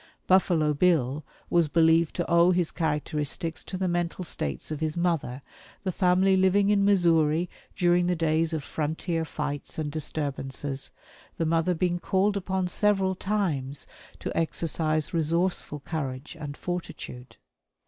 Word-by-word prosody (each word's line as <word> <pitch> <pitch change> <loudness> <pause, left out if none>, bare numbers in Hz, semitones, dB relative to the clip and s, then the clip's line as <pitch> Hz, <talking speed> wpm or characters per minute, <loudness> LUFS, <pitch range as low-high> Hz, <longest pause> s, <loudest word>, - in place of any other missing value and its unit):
"Buffalo 170 -5 +3
Bill" 150 -3 +2 0.3
was 170 -2 +4
believed 165 +1 +3
to 175 - -1
owe 170 +1 +5
his 180 -2 +2
characteristics 150 0 -2
to 185 - -5
the 185 0 0
mental 175 +1 -1
states 70 - -4
of 155 - -3
his 155 +1 -2
mother, 160 -7 -1 0.4
the 190 - -1
family 185 +1 +3
living 195 +2 +3
in 200 -1 +3
Missouri 170 -4 +3 0.3
during 175 -1 +3
the 180 - +2
days 160 0 +1
of 160 -3 -2
frontier 160 +3 -2
fights 145 -2 -4
and 150 -2 -2
disturbances, 140 -2 -3 0.5
the 165 - 0
mother 165 +2 +2
being 175 +1 0
called 195 +3 +1
upon 190 -1 -1
several 195 0 +2
times 165 -10 -2 0.3
to - - -5
exercise 155 -1 0
resourceful 165 -2 0
courage 135 -2 -5
and 145 -2 -6
fortitude. 165 -8 -6
165 Hz, 140 wpm, -27 LUFS, 150-180 Hz, 0.5 s, owe